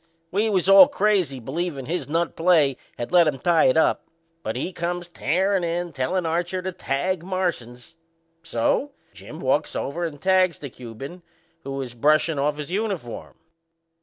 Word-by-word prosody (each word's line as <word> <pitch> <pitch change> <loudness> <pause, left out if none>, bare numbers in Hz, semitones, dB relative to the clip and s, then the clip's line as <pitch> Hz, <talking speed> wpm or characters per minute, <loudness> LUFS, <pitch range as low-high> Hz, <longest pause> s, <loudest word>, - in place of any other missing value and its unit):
We 210 +4 +1
was 190 -3 +1
all 195 +7 +9
crazy, 200 - +1
believin' 140 +2 -4
his 170 +2 -3
nut 165 +2 -1
play 160 -5 +3 0.2
had 120 - -5
let 175 -2 +6
'em 145 -3 0
tie 165 +4 +3
it 130 - +4
up; 160 - +2 0.3
but 110 - -4
he 175 +9 -3
comes 175 +1 -3
tearin' 185 +4 0
in, 170 0 -2
tellin' 170 +8 -1
Archer 175 +3 -1
to 185 - -2
tag 175 +3 -2
Marsans. 170 -10 -3 0.5
So 165 - 0 0.2
Jim - - -11
walks - - 0
over 170 +5 -3
and 150 -3 -6
tags 185 -1 +3
the 140 -3 -8
Cuban, 130 +9 -9 0.4
who 135 - -5
was 135 -3 -5
brushin' 150 +4 +2
off 145 +1 0
his 150 +2 -6
uniform. 195 - -4
170 Hz, 165 wpm, -24 LUFS, 140-185 Hz, 0.5 s, all